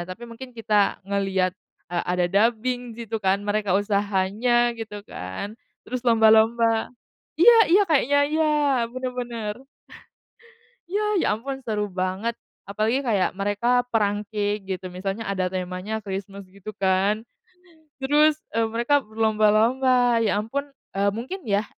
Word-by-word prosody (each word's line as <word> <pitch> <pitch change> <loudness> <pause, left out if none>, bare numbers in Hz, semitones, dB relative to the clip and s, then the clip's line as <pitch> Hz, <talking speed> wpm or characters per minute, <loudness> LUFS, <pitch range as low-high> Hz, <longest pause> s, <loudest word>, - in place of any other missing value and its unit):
tapi 205 +6 -8
mungkin 240 +2 -10
kita 210 -4 +1
ngeliat, 195 -2 0 0.4
eee, 175 - 0
ada 180 0 +1
dubbing 230 +5 0
di 235 - -6
situ 225 0 -4
kan, 190 -1 +2
mereka 205 -2 +1
usahanya 205 +4 +1
gitu 210 -2 -7
kan, 95 - -6 0.3
terus 255 0 -4
lomba-lomba. 225 0 +4 0.5
Iya 475 +7 +9 0.2
iya, 395 - +7
kayaknya 285 -2 +3
iya 315 +1 +1 0.5
bener 255 0 -4
bener. 235 -1 -5 1.3
Iya, 410 +3 0 0.2
ya - - 0
ampun 270 +3 -6
seru 215 -4 -2 0.2
banget 190 +5 -1 0.4
apalagi 215 +6 0
kayak 205 -6 +2
mereka 205 +5 +1
perang 205 -2 +1
cake 210 -1 -1
gitu 190 -1 -5
misalnya 195 +4 -4
ada 190 -2 -1
temanya 185 +3 -4
Christmas 195 0 -6
gitu 200 +2 -10
kan, 195 +2 +1 0.8
terus, 295 +3 +4 0.2
eee, 230 - +3
mereka 235 +6 +2
berlomba-lomba, 225 +3 +2
ya 205 -1 +1
ampun, 270 +7 -3 0.3
eee, 200 +1 +2
mungkin 260 - -6
ya, 205 -1 +1
215 Hz, 130 wpm, -24 LUFS, 200-240 Hz, 1.3 s, Iya